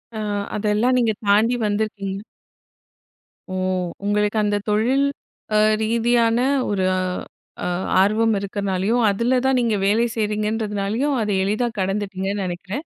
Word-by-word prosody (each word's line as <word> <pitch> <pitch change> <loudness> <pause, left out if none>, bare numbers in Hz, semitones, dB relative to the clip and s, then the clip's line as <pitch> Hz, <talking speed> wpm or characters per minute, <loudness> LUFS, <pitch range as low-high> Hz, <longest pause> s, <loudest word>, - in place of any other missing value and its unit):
அ - - -4 0.4
அதெல்லாம் 215 +4 +1
நீங்கத் 225 -4 0
தாண்டி 215 +4 +4
வந்திருக்கீங்க. 205 -2 -2 1.3
ஓ. - - -3 0.5
உங்களுக்கு 210 +1 +1
அந்தத் 205 -1 -1
தொழில் 245 +7 +2 0.5
அ - - +5 0.2
ரீதியான 230 +1 +2 0.3
ஒரு 195 -2 0 0.8
அ - - 0 0.3
ஆர்வம் 220 +3 +3
இருக்கிறதனாலயும், 200 +3 -1
அதுல 235 +6 +1
தான் 265 -1 +3
நீங்க 230 -3 +1
வேலை 225 +3 +3
செய்றீங்கன்றதனாலயும் 215 +4 -1
அதை 210 -2 0
எளிதா 215 +5 0
கடந்துட்டீங்கன்னு 195 0 -2
நெனைக்கிறேன். 190 - -5
210 Hz, 110 wpm, -21 LUFS, 200-230 Hz, 1.3 s, அ